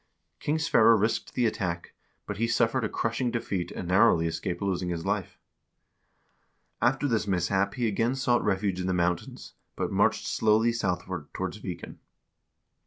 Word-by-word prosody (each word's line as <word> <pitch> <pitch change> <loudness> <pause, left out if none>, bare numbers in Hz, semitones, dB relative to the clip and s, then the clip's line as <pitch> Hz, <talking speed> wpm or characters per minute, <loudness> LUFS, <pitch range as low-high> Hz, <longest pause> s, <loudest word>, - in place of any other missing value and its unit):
King 150 +2 0
Sverre 115 -8 +5
risked 110 +3 -1
the 125 - +2
attack, 90 -5 -2 0.3
but - - -5
he 115 +2 +1
suffered 115 +2 +1
a 110 - -1
crushing 115 +2 -1
defeat, 100 -6 -2
and 90 - -6
narrowly 90 -2 +4
escaped 85 +2 -3
losing 95 -3 -1
his 85 0 -3
life. 100 -2 -2 1.4
After 135 +4 +2
this 115 -5 0
mishap 95 +2 +1
he 120 -3 0
again 115 +4 0
sought 125 -2 +1
refuge 95 -2 0
in 90 - -2
the 95 - +1
mountains, 90 -1 -2 0.2
but - - -2
marched - - +2
slowly 110 +2 +2
southward 90 -7 -3
towards 95 +3 -4
Viken. 90 -4 -7
100 Hz, 155 wpm, -28 LUFS, 90-115 Hz, 1.4 s, Sverre